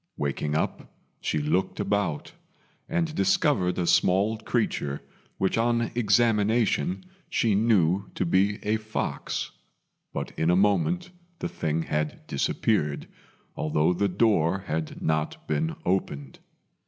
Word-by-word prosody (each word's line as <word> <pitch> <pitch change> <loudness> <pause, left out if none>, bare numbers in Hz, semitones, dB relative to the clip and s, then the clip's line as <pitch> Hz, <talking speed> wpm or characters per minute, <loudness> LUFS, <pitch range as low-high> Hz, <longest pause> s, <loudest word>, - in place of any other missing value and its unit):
Waking 75 +1 -1
up, 80 - -2 0.3
she - - -1
looked 75 +6 0
about, 100 -6 -1 0.6
and 165 -2 0
discovered 95 - +2
a 90 - 0
small 95 +6 +3
creature 105 - -1 0.3
which 95 +3 +1
on 115 0 +1
examination 115 - +2 0.3
she 110 -3 +2
knew 100 -3 +2
to - - 0
be 95 +4 +2
a 105 +1 +2
fox; 110 0 -3 0.6
but - - -4
in 80 - +1
a 90 - +5
moment 105 - +2 0.3
the - - -3
thing 80 +1 -2
had 75 0 -2
disappeared, 75 +2 0 0.5
although 75 +2 +1
the 100 +3 +1
door 95 -2 +2
had 80 0 -3
not 80 -1 -1
been 80 +1 0
opened. 70 -7 -2
95 Hz, 120 wpm, -26 LUFS, 80-110 Hz, 0.6 s, a